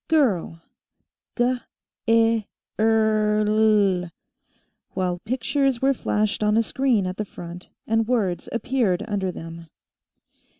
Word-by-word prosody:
Girl 220 - +1 0.8
guh 250 +1 +1 0.5
ih 225 -1 +3 0.3
rrr 215 -1 +2
lll," 210 -4 +3 0.9
while 180 -2 -1
pictures 265 +1 0
were 270 +2 +3
flashed 215 -4 -1
on 210 +1 +2
a 230 - +4
screen 245 -4 +1
at 185 0 -4
the 215 - -1
front, 175 -3 -10 0.2
and 225 0 +1
words 205 -8 -1
appeared 230 -6 0
under 195 -3 -1
them. 165 -1 -9
215 Hz, 115 wpm, -23 LUFS, 185-235 Hz, 0.9 s, a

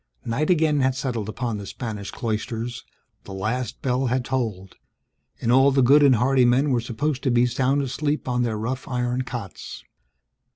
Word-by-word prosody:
Night 135 +7 -1
again 155 -4 +3
had 130 -1 +2
settled 120 -6 -3
upon 115 -1 -3
the 100 - -8
Spanish 105 -4 -6
cloisters, 115 +1 -4 0.4
the 95 - -8
last 115 +6 -3
bell 130 0 +1
had 125 0 0
tolled; 110 -8 -3 0.6
and 115 - 0
all 135 +2 +6
the 135 -1 +3
good 140 +4 +6
and 140 -3 +6
hardy 130 +3 +3
men 130 +4 +3
were 120 -2 +2
supposed 130 +4 -2
to 130 - 0
be 120 0 +3
at 125 - +2
sound 135 +2 +1
sleep 150 0 -2
on 125 -1 0
their 115 -3 -1
rough 125 +5 -4
iron 125 0 -1
cots. 120 - -7
125 Hz, 180 wpm, -24 LUFS, 115-135 Hz, 0.6 s, all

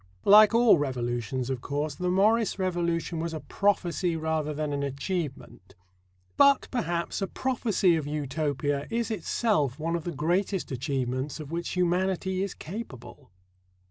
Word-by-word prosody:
Like 210 +2 +8
all 230 -8 +6
revolutions, 125 -2 -2
of 130 -2 -3
course, 145 +2 -2
the 180 +5 -2
Morris 210 +5 +2
revolution 170 -3 -1
was 165 0 -3
a - - -4
prophecy 180 -2 0
rather 160 -1 -1
than 150 0 -3
an 140 - -2
achievement. 140 +2 -5 0.6
But, 280 -1 +5
perhaps, 175 -7 -2
a 195 - 0
prophecy 220 -7 +1
of 155 -3 -2
Utopia 145 -1 -2
is 230 0 -1
itself 205 - 0
one 165 +2 -2
of 170 - -3
the 175 - -3
greatest 175 +5 -1
achievements 130 +2 -2
of 150 -1 -8
which 170 +1 -3
humanity 185 +1 0
is 195 -1 -3
capable. 155 - -9
165 Hz, 140 wpm, -27 LUFS, 145-190 Hz, 0.6 s, Like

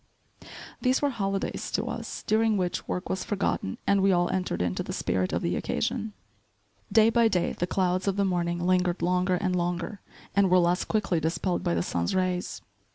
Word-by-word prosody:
These 255 +2 +2
were 285 - +3
holidays 195 -4 -2
to 210 - 0
us, 230 -2 -5
during 220 0 +2
which 180 -2 -2
work 180 - -3
was 190 - -2
forgotten 195 - -1
and 200 -1 +3
we 195 0 +4
all 175 -1 +2
entered 185 -1 -1
into 90 0 -1
the - - -5
spirit 90 0 -1
of - - -1
the - - 0
occasion. 210 - -2 0.8
Day 225 0 +5
by 235 -1 +4
day 180 -5 0
the 175 - -2
clouds 185 0 0
of 195 - +2
the 200 0 +1
morning 175 -2 0
lingered 180 -1 +1
longer 180 +1 +2
and 185 0 0
longer 175 +3 -2 0.3
and 200 -1 +4
were 185 - +5
less 175 0 +2
quickly 205 -6 0
dispelled 170 +3 -1
by 85 - +1
the 85 - 0
sun's 85 - -1
rays. 185 -1 -1
185 Hz, 190 wpm, -27 LUFS, 175-200 Hz, 0.8 s, Day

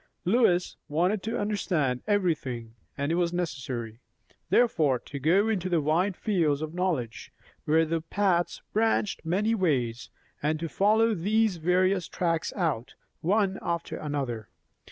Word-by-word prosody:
Lois 180 -3 +2
wanted 180 +7 +1
to 225 +4 -3
understand 170 -11 0
everything; 145 - -1 0.2
and 140 +2 -1
it 170 +2 +2
was 170 -1 +1
necessary, 130 -10 -4 0.5
therefore, 160 - +3
to 140 +3 -8
go 180 +9 +3
into 185 -5 +1
wide 170 +6 +1
fields 160 -8 +1
of 155 0 -5
knowledge, 165 -11 -2 0.3
where 160 +2 +3
the 165 +1 -1
paths 175 +1 0
branched 220 -1 +1
many 195 +7 +1
ways, 125 - 0 0.3
and 155 +1 0
to 165 - -3
follow 220 +6 +3
these 210 +2 +1
various 180 +2 +2
tracks 165 -2 -1
out, 155 - -1 0.2
one 195 +2 +1
after 170 -1 -3
another. 135 -7 -4
170 Hz, 135 wpm, -27 LUFS, 145-195 Hz, 0.5 s, therefore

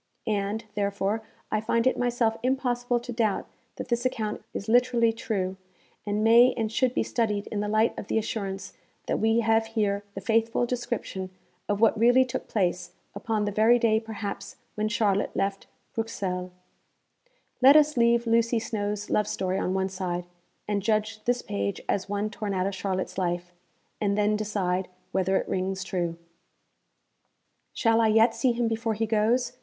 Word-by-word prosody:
And, 210 0 -1
therefore, 200 +1 -1 0.3
I 215 - +1
find 230 +2 +1
it 260 - +3
myself 240 -2 +1
impossible 245 -1 0
to 240 +1 -7
doubt 220 -3 0 0.3
that - - -7
this 240 0 0
account 220 -4 -2
is 200 - -6
literally 240 -1 +3
true, 190 -5 -2 0.5
and 205 +1 0
may 235 +3 +6
and 220 -2 -1
should 255 +2 +1
be - - +2
studied 210 -4 -1
in 210 - -2
the 210 - -1
light 215 +2 +2
of - - -7
the - - 0
assurance 200 -3 -3 0.3
that - - -1
we 225 +1 +3
have 225 0 +2
here 200 -1 +1
the - - -3
faithful 225 +3 +1
description 240 -6 -3 0.4
of 205 0 0
what 225 -1 +4
really 245 +3 +5
took 245 - -5
place, 180 -4 -1 0.2
upon 215 -2 -1
the 205 - -1
very 220 +4 +5
day, 225 -2 +3
perhaps, 220 -2 -6 0.2
when 215 0 -1
Charlotte 210 -3 0
left 195 0 -2 0.3
Bruxelles. 195 -5 -3 1.1
Let 270 +3 +8
us 300 0 +5
leave 235 0 +3
Lucy 230 +1 +2
Snowe's 210 -2 -3
love 210 -1 +2
story 185 0 -1
on 185 - -1
one 190 0 0
side, 180 -2 -3 0.4
and 205 -1 0
judge 215 +1 -1
this 245 0 +1
page 100 0 -2
as 200 0 -1
one 205 +1 -1
torn 205 -2 -3
out 185 0 0
of 200 - -1
Charlotte's 190 -1 -3
life 175 0 -2 0.5
and 200 -1 +1
then 210 0 +2
decide 195 -3 -1 0.2
whether 190 0 +1
it - - -2
rings 190 0 -2
true. 175 -3 -2 1.5
Shall 225 -1 +2
I 225 - +4
yet 225 +2 +5
see 255 +1 +2
him 235 0 0
before 225 0 -1
he 225 +2 0
goes? 225 +3 +1
215 Hz, 170 wpm, -27 LUFS, 200-230 Hz, 1.5 s, Let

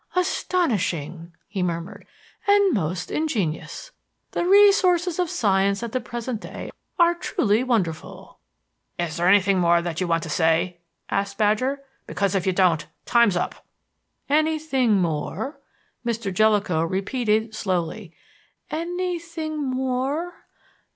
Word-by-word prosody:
"Astonishing!" 180 - -1 0.2
he 200 -2 -4
murmured; 170 +1 -4 0.4
"and 405 -3 +5
most 180 -1 -2
ingenious. 270 - -2 0.4
The 345 - -1
resources 370 -3 +5
of 355 -2 +1
science 200 -2 +1
at 235 - -4
the 255 - -1
present 235 0 -5
day - - -8 0.3
are 345 -1 +5
truly 245 - 0
wonderful." 190 -11 -3 0.6
"Is 170 -3 -3
there 175 +1 +1
anything 195 0 +4
more 170 -1 +4
that 170 0 -4
you 185 - 0
want 165 -1 +1
to - - -5
say?" 170 +3 +1 0.3
asked 200 0 -1
Badger; 255 +7 +1 0.2
"because 200 -2 -1
if 195 -1 0
you - - +4
don't, 175 -5 +2 0.2
time's 235 -6 +4
up." - - -3 0.6
"Anything 305 -5 +2
more?" 170 - -2 0.4
Mr. 230 -4 -2
Jellicoe 205 -5 +2
repeated 215 +5 0
slowly; 185 -2 -2 0.6
"anything 335 -2 -3
more? 265 +6 -1
215 Hz, 120 wpm, -23 LUFS, -, 0.6 s, and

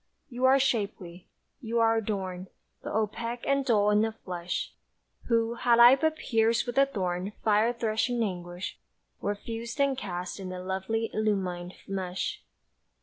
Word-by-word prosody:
You 250 +1 0
are 265 +1 +7
shapely, 200 -9 -2 0.3
you 230 -1 -1
are 225 0 +4
adorned, 190 -4 -3 0.3
But - - -6
opaque 230 +2 -2
and 275 0 +2
dull 210 -5 +3
in 210 0 +4
the 225 0 +1
flesh, 180 -4 -4 0.5
Who, 230 -1 +2
had 235 0 +3
I 240 +2 +9
but 315 +3 +1
pierced 225 -4 +1
with 245 -1 -4
the 275 0 +6
thorned 185 -4 -2
Fire 215 +2 +3
threshing 235 +1 0
anguish, 175 -2 -5 0.4
were 205 - -1
fused 230 +5 -6
and 280 -1 +3
cast 180 -5 -5
In 185 -1 -6
a 185 - -5
lovely 190 +4 -2
illumined 185 -4 -1
mesh. 190 - -3
220 Hz, 150 wpm, -28 LUFS, 190-235 Hz, 0.5 s, I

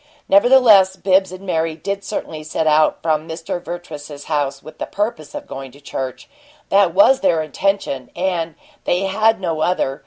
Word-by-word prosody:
Nevertheless, 200 -3 +6
Bibbs 190 -1 +2
and 185 +1 -10
Mary 165 -3 -1
did 200 +5 -4
certainly 160 -6 -5
set 155 +1 -2
out 155 0 +3
from 160 0 0
Mr. 165 +2 -5
Vertrees's 150 -4 -8
house 145 -3 -2
with 155 - -13
the - - -4
purpose 205 -7 -4
of - - -6
going 135 -1 -8
to 140 - -16
church. 135 -2 -6 0.4
That 195 -4 +3
was 260 +7 +6
their 165 -4 +2
intention, 155 -5 -2
and 170 -4 -2 0.3
they 180 - +1
had 215 +3 +2
no 165 -4 -2
other. 145 -6 0
170 Hz, 165 wpm, -19 LUFS, 155-195 Hz, 0.4 s, Nevertheless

